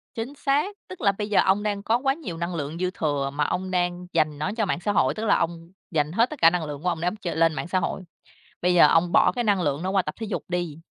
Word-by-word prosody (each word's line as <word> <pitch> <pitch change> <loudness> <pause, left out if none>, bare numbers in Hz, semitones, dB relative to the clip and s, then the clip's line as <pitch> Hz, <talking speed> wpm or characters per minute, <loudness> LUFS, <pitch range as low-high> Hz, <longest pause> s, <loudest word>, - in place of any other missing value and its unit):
Chính 235 +5 -4
xác. 295 +9 0
Tức 370 - -9
là 200 -3 +4
bây 210 +1 -5
giờ 205 - +3
ông 195 +2 +2
đang 205 -1 -2
có 230 +3 +2
quá 270 +1 +1
nhiều 270 - -7
năng 170 +1 -3
lượng 150 +1 -4
dư 185 0 -1
thừa 145 -3 -1
mà 150 +1 0
ông 185 +4 -2
đang 175 0 -1
dành 155 -1 +1
nó 155 +7 -2
cho 215 - +1
mạng 175 - -1
xã 205 +3 -1
hội, 130 -8 +2
tức 220 +1 -4
là - - +4
ông 165 +1 -3 0.2
dành 150 -1 0
hết 230 +7 +2
tất 305 - -9
cả 165 - +8
năng 175 -1 -2
lượng 145 0 -7
của 180 - +1
ông 165 -2 -3
để 175 - 0
ông 190 - -1
chơi 190 -5 -5
lên 165 -1 +3
mạng 160 - -4
xã 185 +1 +1
hội. - - -3 0.6
Bây 180 +1 +2
giờ 175 - +7
ông 170 +2 +3
bỏ - - +5
cái 240 - -2
năng 200 -4 +2
lượng 145 -1 -1
nó 185 - -1
qua 195 - +3
tập 155 -3 -6
thể 225 - -3
dục - - -3
đi, 175 -4 -3
180 Hz, 305 wpm, -25 LUFS, 165-210 Hz, 0.6 s, cả